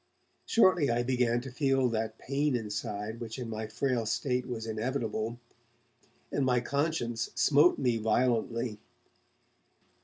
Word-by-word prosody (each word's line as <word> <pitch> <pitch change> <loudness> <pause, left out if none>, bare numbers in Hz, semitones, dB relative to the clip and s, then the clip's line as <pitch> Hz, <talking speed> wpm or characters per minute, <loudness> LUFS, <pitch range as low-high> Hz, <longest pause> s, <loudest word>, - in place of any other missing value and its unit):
Shortly 185 -9 +4
I 120 +1 +1
began 120 -1 +1
to 130 +1 -8
feel 135 0 +2
that 110 -1 -2
pain 140 0 0
inside 105 0 -4
which 115 0 -6
in 120 -3 -5
my 110 0 -4
frail 115 0 -1
state 125 +1 -1
was 115 -3 -4
inevitable, 115 0 -2 0.9
and 140 - 0
my 125 -2 +3
conscience 125 -4 -1
smote 145 +7 +5
me 125 -4 +1
violently. 115 0 0
120 Hz, 125 wpm, -30 LUFS, 110-130 Hz, 0.9 s, smote